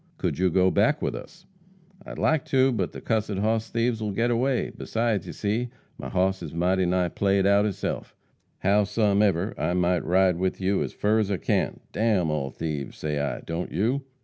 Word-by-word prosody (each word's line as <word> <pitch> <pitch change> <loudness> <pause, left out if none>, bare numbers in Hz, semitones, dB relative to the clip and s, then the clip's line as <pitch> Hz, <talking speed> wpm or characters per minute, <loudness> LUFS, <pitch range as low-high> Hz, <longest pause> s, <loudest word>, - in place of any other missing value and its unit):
"Could - - -2
you 95 0 +3
go 95 +1 +3
back 115 +9 +2
with - - 0
us?" 180 0 -10 0.6
"I'd - - -9
like 155 -3 +2
to, 130 0 +3
but 100 -7 -1
the - - -9
cussed 110 -2 0
hoss 110 +2 0
thieves 115 -1 0
will 105 - -1
get 115 +4 +1
away. 125 +2 0
Besides, 115 -4 -1
you - - -5
see, 110 +4 -2 0.3
my - - -6
hoss 95 +1 +1
is - - -7
mighty 90 +2 +2
nigh 90 0 +1
played 100 +2 +1
out 100 +1 +4
hisself. 100 -3 -3 0.5
Howsumever, 100 -1 +2
I 90 - 0
might 90 -1 +1
ride 95 0 +3
with 95 +1 -1
you 95 +1 +1
as - - -2
fur 105 +2 +1
as 105 -2 0
I 100 - 0
can. - - -1
D - - -7
n 100 -8 +2
all 70 -3 -2
thieves, 75 -2 -5
say 75 -1 -2
I, 70 0 -2
don't 85 +2 -4
you?" 120 +8 0
100 Hz, 200 wpm, -26 LUFS, 90-110 Hz, 0.6 s, out